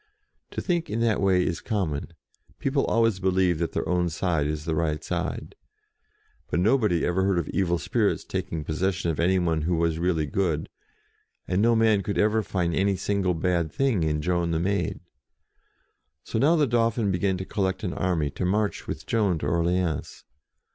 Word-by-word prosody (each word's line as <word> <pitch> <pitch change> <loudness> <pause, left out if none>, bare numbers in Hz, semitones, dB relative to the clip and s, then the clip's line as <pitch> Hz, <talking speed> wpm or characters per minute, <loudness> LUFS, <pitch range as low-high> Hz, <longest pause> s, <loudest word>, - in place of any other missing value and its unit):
To - - -4
think 175 -3 -1
in 110 - -2
that 115 -3 +2
way 95 -2 +3
is 85 - -2
common: 90 -10 -2 0.5
people 135 0 0
always 115 -4 +2
believe 95 -3 +2
that 85 - -2
their - - -2
own 90 -1 +1
side 80 -3 0
is 75 0 -3
the 80 - -1
right 75 -1 -1
side. - - -3 1.0
But - - 0
nobody 105 -4 +2
ever 90 +2 +1
heard 95 -1 +2
of 85 - -1
evil 85 -3 +1
spirits - - 0
taking 80 -2 -4
possession 90 +3 -1
of 75 - -5
any 90 +3 +3
one 85 -3 +1
who 85 +3 0
was 80 -1 0
really 85 -3 +1
good; 80 0 -1 0.8
and 90 +2 +1
no 115 +1 +4
man 110 -3 +3
could 100 +2 -3
ever 110 +1 +3
find 90 -4 -1
any 100 +3 +2
single 95 -2 0
bad 85 -1 0
thing 135 -9 +1
in 75 -1 0
Joan 85 0 0
the 80 -1 0
Maid. 100 +4 -1 1.2
So 110 - -2
now 155 +7 +4
the 155 -3 +3
Dauphin 115 -3 +1
began 95 +1 0
to 95 - -5
collect 95 +1 -2
an 90 - -2
army 80 -6 0
to 90 - -5
march 105 +3 0
with - - -5
Joan 100 -6 +1
to - - -5
Orleans. 85 -1 -1
90 Hz, 180 wpm, -26 LUFS, 85-100 Hz, 1.2 s, no